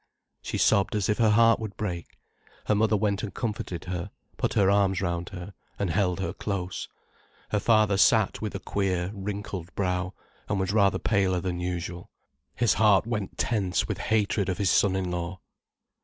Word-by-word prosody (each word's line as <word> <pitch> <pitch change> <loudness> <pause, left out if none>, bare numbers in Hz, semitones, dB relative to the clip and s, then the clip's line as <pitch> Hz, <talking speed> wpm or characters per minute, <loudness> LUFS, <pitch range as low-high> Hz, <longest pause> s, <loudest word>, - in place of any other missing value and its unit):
She - - -4
sobbed 100 +1 +3
as 105 -3 0
if 105 - +1
her 115 -2 +5
heart 115 +1 +5
would 110 -3 -6
break. 90 -5 -5 0.5
Her - - +2
mother 110 +1 +3
went 100 -1 0
and 105 - -4
comforted 105 -7 -4
her, 90 +1 -4 0.3
put - - -1
her 100 - +4
arms 100 -1 +3
round 85 -2 -2
her, 95 0 -8 0.2
and 100 -4 -1
held 90 0 +1
her 95 - -2
close. 95 -3 -4 0.6
Her 105 - +2
father 105 -3 +3
sat 110 0 +3
with 105 -2 -4
a - - -3
queer, 95 -2 -1
wrinkled 100 -3 -5
brow, 90 -1 -1 0.3
and 105 - 0
was 95 +1 -1
rather 100 -2 +4
paler 95 -4 +1
than 90 -1 -3
usual. 90 0 -4 0.5
His 120 -2 +3
heart 105 -2 +4
went 105 -4 -3
tense 100 -6 0
with - - -3
hatred 105 -2 +1
of 90 - -1
his 100 -4 +2
son 95 -2 +3
in 95 -2 -2
law. 90 +1 -4
100 Hz, 180 wpm, -27 LUFS, 90-105 Hz, 0.6 s, her